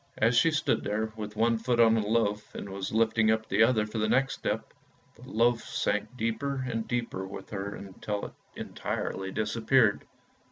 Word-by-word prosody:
As 115 +2 +3
she 165 - +5
stood 155 -1 +1
there 110 +1 -2
with 105 -1 -6
one 115 +1 +2
foot 120 +1 0
on 115 -1 +7
the 115 - +2
loaf 105 -1 0
and - - -5
was 95 0 -5
lifting 110 0 +3
up 110 0 +1
the - - +2
other 110 -2 +4
for 105 +1 -4
the 110 0 +1
next 135 +3 +2
step, - - -3 0.4
the - - -14
loaf 115 +1 +2
sank 115 +4 -2
deeper 130 +4 -2
and 115 -2 -3
deeper 115 -6 -2
with 95 - -9
her 100 0 -4 0.2
till 105 -1 -3 0.2
she - - -6
entirely 95 0 -4
disappeared. 110 +2 +2
110 Hz, 185 wpm, -29 LUFS, 105-115 Hz, 0.4 s, on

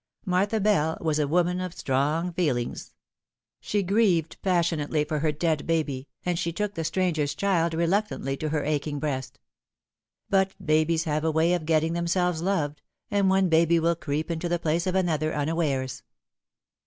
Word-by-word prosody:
Martha 195 +4 +1
Bell 190 -7 +2
was 155 -2 0
a 150 - +1
woman 180 +3 +1
of 180 -2 -5
strong 150 +6 0
feelings. 145 -9 -2 0.6
She 205 -1 -1
grieved 185 -5 +1
passionately 165 -5 +1
for 150 0 -2
her 155 +1 +1
dead 155 0 -1
baby, 145 -5 -1 0.2
and 175 -1 0
she 170 -1 -1
took 210 +4 -2
the 165 - -3
stranger's 160 -4 0
child 170 -4 +1
reluctantly 170 -4 0
to 155 - -3
her 150 -1 -1
aching 150 0 -1
breast. 135 -3 -3 0.9
But 195 -1 +2
babies 160 -1 +2
have 155 -1 -1
a 160 - +2
way 160 +2 +2
of 165 -3 -2
getting 160 0 +2
themselves 170 0 0
loved, 155 -6 -1 0.3
and 200 -2 +3
one 190 0 +3
baby 165 0 +4
will 170 +1 +2
creep 155 +1 -3
into 170 +1 -2
the 175 - +1
place 165 +2 -1
of 185 - 0
another 155 -4 0
unawares. 145 -4 -1
165 Hz, 165 wpm, -26 LUFS, 155-180 Hz, 0.9 s, baby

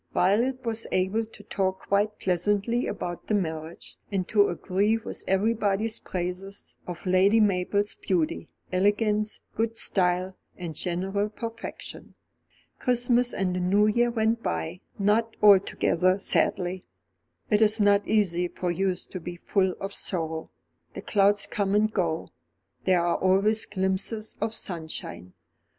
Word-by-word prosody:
Violet 240 +8 +2
was 225 0 -1
able 190 +5 +1
to 215 -1 -15
talk 190 -2 -1
quite 205 +2 +1
pleasantly 205 +6 0
about 175 -1 -5
the 215 - +1
marriage, 160 -3 -4
and 190 -2 -1
to 205 -2 +4
agree 200 +5 +1
with 225 - -6
everybody's 215 +2 +1
praises 185 +2 -5
of 175 +1 -7
Lady 190 +4 +4
Mabel's 200 0 +1
beauty, 175 -5 -1 0.2
elegance, 210 +2 +1
good 225 +1 -1
style, 185 -1 +1 0.2
and 175 -3 -5
general 195 +5 -1
perfection. 230 +1 -8 0.6
Christmas 245 -1 +2
and 185 -2 -1
the - - -1
New 195 +4 +3
Year 235 +3 +3
went 225 0 +1
by, 80 - -3 0.2
not 220 +3 +1
altogether 190 -2 +4
sadly. 185 -2 0 0.7
It 210 +1 +4
is 220 +1 +4
not 205 0 +4
easy 180 -5 +2
for 175 0 -3
youth 185 +1 -1
to 185 - -5
be 175 +1 -7
full 190 +1 0
of 195 +1 -4
sorrow. 160 -3 -2 0.5
The - - -6
clouds 200 0 +3
come 200 -1 -1
and 215 +1 +2
go, 165 -4 -1 0.6
there 180 -2 +3
are 175 - +1
always 200 +4 +2
glimpses 195 +3 -2
of 220 +1 -1
sunshine. 160 - -5
195 Hz, 135 wpm, -26 LUFS, 180-215 Hz, 0.7 s, to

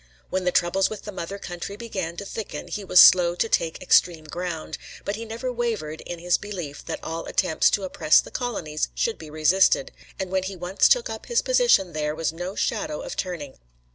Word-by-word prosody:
When 185 -1 -1
the 180 - +3
troubles 175 +3 +2
with 215 -2 -7
the 210 - -6
mother 190 +1 -5
country 180 +1 -6
began 190 -7 -5
to 200 - -5
thicken 220 +2 -6
he 210 - -4
was 180 -1 +5
slow 175 -1 +8
to 225 - 0
take 165 -6 0
extreme 170 -3 +3
ground, 160 -1 -5 0.3
but 200 - -2
he 225 +2 -6
never 235 +3 -4
wavered 220 -11 -3
in 175 - -5
his 175 +1 +1
belief 180 -9 -6
that - - -5
all 165 +1 -4
attempts 175 -5 +2
to 200 - 0
oppress 180 -4 +4
the - - -5
colonies 185 -12 -2
should 230 - -1
be 155 - -10
resisted, 155 0 +3 0.3
and 190 -1 -4
when 190 0 +1
he 190 +1 -5
once 180 +2 +2
took - - +4
up - - -7
his 475 - +1
position 485 - +3
there 150 0 -2
was 160 0 -1
no 180 +4 -5
shadow - - -2
of - - -6
turning. 165 -7 -5
180 Hz, 205 wpm, -24 LUFS, 165-205 Hz, 0.3 s, slow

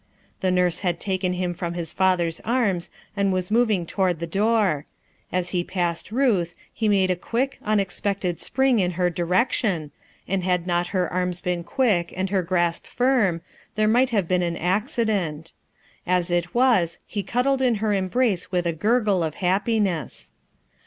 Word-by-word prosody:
The 185 - 0
nurse 180 -2 +2
had 175 -3 -1
taken 185 -2 -1
him 180 -1 -2
from 170 0 -4
his 170 -2 -4
father's 175 -3 +1
arms 215 -8 0 0.3
and 200 -1 +1
was 185 +1 -2
moving 220 -6 +2
toward 185 0 0
the 170 - -2
door; 195 -4 +1 0.4
as 180 -1 -1
he 180 -2 0
passed 175 0 -2
Ruth, 215 -9 +1 0.2
he 220 -1 0
made 190 -2 +3
a - - +1
quick, 240 +9 -2
unexpected 200 -3 -1
spring 265 -2 +2
in 180 -2 +1
her 180 -1 +2
direction, 175 - 0 0.4
and 190 -1 -1
had 180 -1 0
not 175 -1 0
her 180 -1 0
arms 180 -1 -1
been 175 -1 -2
quick 195 -6 +1
and 190 0 -1
her 195 -2 +2
grasp 175 -1 0
firm, 245 -10 +1 0.3
there 215 0 +2
might 245 +4 +4
have 205 -8 0
been 180 0 +2
an 170 -1 -1
acci 210 - 0
dent. 165 -7 -2 0.5
As 180 0 +1
it 175 +2 -1
was, 235 -10 +3
he 205 - -3
cuddled 260 +5 0
in 250 -3 +3
her 210 0 0
embrace 195 0 0
with 180 -1 0
a 170 - 0
gurgle 205 0 +2
of 155 -2 -3
happiness. 190 - -1
185 Hz, 170 wpm, -24 LUFS, 175-215 Hz, 0.5 s, might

